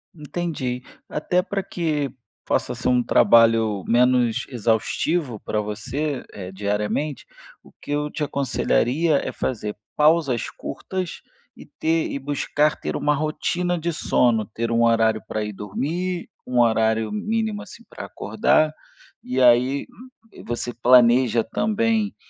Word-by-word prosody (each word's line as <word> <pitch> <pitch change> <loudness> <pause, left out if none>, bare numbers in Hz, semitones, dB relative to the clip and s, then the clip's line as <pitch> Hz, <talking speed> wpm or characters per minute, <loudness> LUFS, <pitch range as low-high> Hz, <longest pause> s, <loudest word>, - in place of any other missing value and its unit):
Entendi. 150 -5 -4 0.3
Até 180 +4 0
para 195 +1 -3
que 150 -7 -2 0.4
possa - - 0
ser - - -4
um 125 -1 +3
trabalho 115 -5 +4
menos 120 -1 +3
exaustivo 120 - 0
para 105 - -2
você, 130 +7 -3
eh, 95 -2 -8
diariamente, 105 +9 -2 0.4
o - - -19
que - - -10
eu 150 0 0
te 150 - -4
aconselharia 140 +2 +1
é - - -3
fazer 105 -4 -3 0.2
pausas 150 -6 +3
curtas 185 -2 -5 0.3
e - - -13
ter 160 0 -1
e - - -3
buscar 145 +2 0
ter - - -4
uma 150 - +1
rotina 170 +4 -1
de 170 +1 -2
sono, 120 -8 +2
ter 115 +2 -4
um 115 0 +3
horário 115 -1 +3
para 110 0 -2
ir 105 - -4
dormir, 160 - -3 0.2
um 125 -1 0
horário 110 -1 +2
mínimo, 215 0 -2
assim, 235 - -12
para - - -8
acordar, 155 0 +1 0.5
e 130 +1 -2
aí, 125 +3 +4
hum, 255 +2 -14 0.2
eh, - - -13
você 120 +1 -3
planeja 120 -1 +5
também, 220 0 0
130 Hz, 135 wpm, -23 LUFS, 115-160 Hz, 0.5 s, planeja